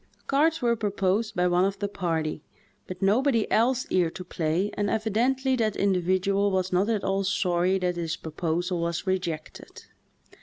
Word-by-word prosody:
Cards 305 Hz, +2 st, +2 dB
were 235 Hz, -1 st, +3 dB
proposed 205 Hz, 0 st, -1 dB
by 180 Hz, -1 st, +2 dB
one 180 Hz, 0 st, +3 dB
of 195 Hz, +1 st, 0 dB
the 205 Hz, +1 st, -2 dB
party, 165 Hz, -6 st, -2 dB, 0.5 s
but 185 Hz, +1 st, -6 dB
nobody 230 Hz, +3 st, +3 dB
else 250 Hz, +3 st, +2 dB
cared 175 Hz, -3 st, 0 dB
to 185 Hz, -, -6 dB
play 175 Hz, +3 st, -1 dB
and 205 Hz, -1 st, -1 dB
evidently 245 Hz, +5 st, +1 dB
that 220 Hz, -4 st, 0 dB
individual 195 Hz, +1 st, +1 dB
was 185 Hz, -1 st, -1 dB
not 190 Hz, +4 st, +2 dB
at 215 Hz, -3 st, 0 dB
all 195 Hz, 0 st, 0 dB
sorry 185 Hz, -1 st, +1 dB
that 180 Hz, -1 st, -1 dB
his 165 Hz, -1 st, -2 dB
proposal 170 Hz, +3 st, -2 dB
was 170 Hz, +2 st, -2 dB
rejected. 175 Hz, -5 st, -4 dB
195 Hz, 160 wpm, -26 LUFS, 180-215 Hz, 0.5 s, were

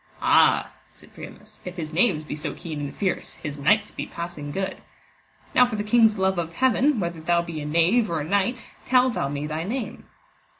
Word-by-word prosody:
Ah, -, -, +4 dB, 0.2 s
said -, -, -18 dB
Priamus, -, -, -12 dB
if 180 Hz, 0 st, -7 dB
his 160 Hz, -3 st, -6 dB
knaves 165 Hz, -3 st, +2 dB
be 150 Hz, -, -6 dB
so 150 Hz, -, -4 dB
keen 155 Hz, -3 st, -6 dB
and 145 Hz, -1 st, -5 dB
fierce, 190 Hz, -3 st, -2 dB
his 145 Hz, -2 st, -7 dB
knights 205 Hz, +9 st, +2 dB
be -, -, -5 dB
passing 170 Hz, -4 st, -6 dB
good: 190 Hz, +5 st, -3 dB, 0.8 s
now 250 Hz, -, +6 dB
for 235 Hz, -, -4 dB
the 210 Hz, -, -2 dB
King's 220 Hz, 0 st, +4 dB
love 190 Hz, -1 st, +1 dB
of 165 Hz, -1 st, -4 dB
Heaven, 260 Hz, -, +2 dB
whether 170 Hz, -3 st, -3 dB
thou 170 Hz, +1 st, +2 dB
be 165 Hz, -3 st, -6 dB
a 150 Hz, -, -5 dB
knave 175 Hz, +9 st, +3 dB
or 165 Hz, -2 st, -1 dB
a 145 Hz, -, -5 dB
knight, 205 Hz, +6 st, 0 dB, 0.2 s
tell 255 Hz, 0 st, +3 dB
thou 140 Hz, -11 st, -2 dB
me 145 Hz, +1 st, -3 dB
thy 155 Hz, +1 st, -3 dB
name. 235 Hz, +6 st, -5 dB
175 Hz, 205 wpm, -24 LUFS, 155-215 Hz, 0.8 s, now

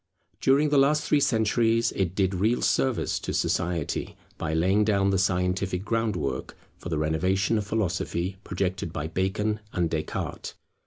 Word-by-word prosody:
During 140 Hz, +3 st, +3 dB
the 145 Hz, -1 st, +4 dB
last 150 Hz, +3 st, +3 dB
three 150 Hz, -, +2 dB
centuries 115 Hz, -1 st, +2 dB
it 95 Hz, -2 st, -2 dB
did 95 Hz, -1 st, +1 dB
real 110 Hz, +6 st, +1 dB
service 130 Hz, -3 st, +1 dB
to -, -, -4 dB
society, 85 Hz, -3 st, -1 dB, 0.2 s
by 85 Hz, -, -2 dB
laying 95 Hz, +6 st, +3 dB
down 100 Hz, -2 st, +2 dB
the 95 Hz, -, +1 dB
scientific 90 Hz, 0 st, 0 dB
groundwork 105 Hz, -, -2 dB, 0.2 s
for -, -, -7 dB
the 80 Hz, -, -1 dB
renovation 90 Hz, +8 st, +1 dB
of 100 Hz, -, -5 dB
Philosophy 95 Hz, -3 st, -1 dB
projected 90 Hz, -2 st, -2 dB
by 75 Hz, -1 st, -4 dB
Bacon 95 Hz, +6 st, -1 dB
and 85 Hz, -2 st, 0 dB
Descartes. 80 Hz, -1 st, -4 dB
95 Hz, 150 wpm, -26 LUFS, 90-110 Hz, 0.2 s, the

